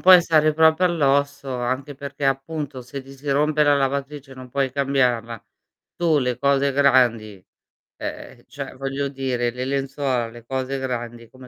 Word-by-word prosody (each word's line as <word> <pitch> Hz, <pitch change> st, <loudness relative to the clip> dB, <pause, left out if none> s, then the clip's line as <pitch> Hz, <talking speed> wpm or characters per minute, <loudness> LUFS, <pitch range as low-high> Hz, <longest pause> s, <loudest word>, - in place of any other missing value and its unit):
puoi 185 Hz, -1 st, +8 dB
stare 155 Hz, -2 st, +3 dB
proprio 160 Hz, +2 st, +4 dB
all'osso, 140 Hz, -5 st, +1 dB
anche 130 Hz, +4 st, -3 dB
perché, 140 Hz, +1 st, -6 dB
appunto, 135 Hz, 0 st, -3 dB
se 140 Hz, +3 st, -7 dB
ti 135 Hz, +1 st, -13 dB
si 140 Hz, +1 st, -5 dB
rompe 150 Hz, +2 st, +2 dB
la 145 Hz, -1 st, +4 dB
lavatrice 140 Hz, 0 st, -2 dB
e -, -, -11 dB
non 130 Hz, -1 st, -11 dB
puoi 135 Hz, -1 st, -1 dB
cambiarla, 125 Hz, -5 st, 0 dB, 0.5 s
tu 165 Hz, -3 st, +2 dB
le 125 Hz, -3 st, 0 dB
cose 140 Hz, 0 st, +2 dB
grandi 120 Hz, -8 st, +2 dB, 0.5 s
ehm, -, -, -7 dB
cioè -, -, -7 dB
voglio 135 Hz, +1 st, -3 dB
dire, 130 Hz, -3 st, -1 dB
le 125 Hz, +1 st, -4 dB
lenzuola, 135 Hz, -3 st, -1 dB
le 120 Hz, 0 st, -13 dB
cose 130 Hz, +2 st, -3 dB
grandi 120 Hz, -3 st, -5 dB
come 130 Hz, -1 st, -14 dB
135 Hz, 160 wpm, -22 LUFS, 125-145 Hz, 0.5 s, puoi